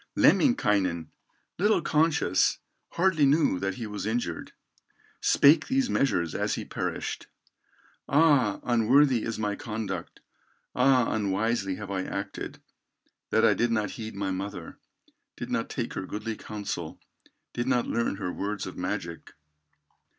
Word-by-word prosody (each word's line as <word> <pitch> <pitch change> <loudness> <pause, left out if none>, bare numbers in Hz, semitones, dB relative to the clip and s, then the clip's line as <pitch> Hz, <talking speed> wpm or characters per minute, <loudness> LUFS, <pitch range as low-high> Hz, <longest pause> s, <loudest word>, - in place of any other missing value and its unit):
Lemminkainen, 95 - +3 0.5
little 210 +3 +3
conscious, 150 - +2 0.4
Hardly 170 -4 +2
knew 140 - +3
that 95 0 -2
he 115 - -5
was 105 -2 -5
injured, 110 -7 -3 0.7
Spake 150 +2 +5
these 265 -1 +1
measures 85 - +1
as - - -1
he - - -5
perished: - - -4 0.8
"Ah! 140 -9 +4
unworthy 125 +2 +4
is 115 0 -3
my 105 -1 -1
conduct, 105 -6 -5 0.5
Ah! 125 -1 +3
unwisely 100 -1 0
have 100 -1 -7
I 95 -1 -1
acted, 100 +1 -5 0.7
That - - +3
I - - +5
did 120 - +1
not 105 -3 0
heed 110 -2 -7
my 100 -1 -2
mother, 100 +2 -6 0.6
Did - - -6
not - - -1
take - - -4
her 95 - -5
goodly 110 +2 -4
counsel, 100 -7 -6 0.5
Did 120 +1 -2
not 125 -2 +2
learn 115 -3 -1
her 90 -2 -4
words 100 0 -3
of - - -7
magic. - - -5
110 Hz, 135 wpm, -27 LUFS, 100-135 Hz, 0.8 s, Spake